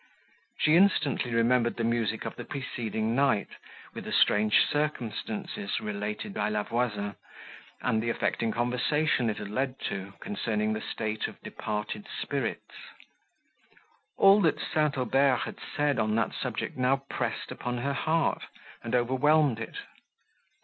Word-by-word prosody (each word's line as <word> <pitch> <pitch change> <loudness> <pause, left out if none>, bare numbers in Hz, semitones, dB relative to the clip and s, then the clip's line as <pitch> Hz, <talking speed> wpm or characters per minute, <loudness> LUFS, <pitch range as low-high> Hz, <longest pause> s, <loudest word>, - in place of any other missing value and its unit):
She 155 +1 +4
instantly 155 -10 +3
remembered 120 +1 +3
the 115 - -1
music 115 -1 0
of - - -4
the 120 - -6
preceding 115 -4 -3
night, 135 -5 +2 0.4
with - - -7
the - - -5
strange 105 0 +4
circumstances, 175 - -2
related 105 - -4
by - - 0
La 105 -1 0
Voisin, 105 -4 -1 0.7
and 110 -1 +1
the 115 - -1
affecting 115 0 0
conversation 125 +2 +1
it 105 - -2
had 105 -1 -6
led 130 +3 -1
to, 95 0 -4
concerning 110 - -1
the 110 - -3
state 110 0 -2
of - - -11
departed 105 0 -4
spirits. - - -3 1.4
All 200 +1 +7
that 160 - +2
St. 150 -2 0
Aubert 130 +1 +3
had - - -7 0.2
said, 145 -4 +2
on 110 -1 +1
that 115 -1 +1
subject, - - -3
now 135 +2 +2
pressed 120 -5 -3
upon 125 0 -3
her 140 +4 -1
heart, 160 +3 +1 0.4
and - - -2
overwhelmed 130 +1 +3
it. 115 - -6
120 Hz, 140 wpm, -29 LUFS, 110-140 Hz, 1.4 s, All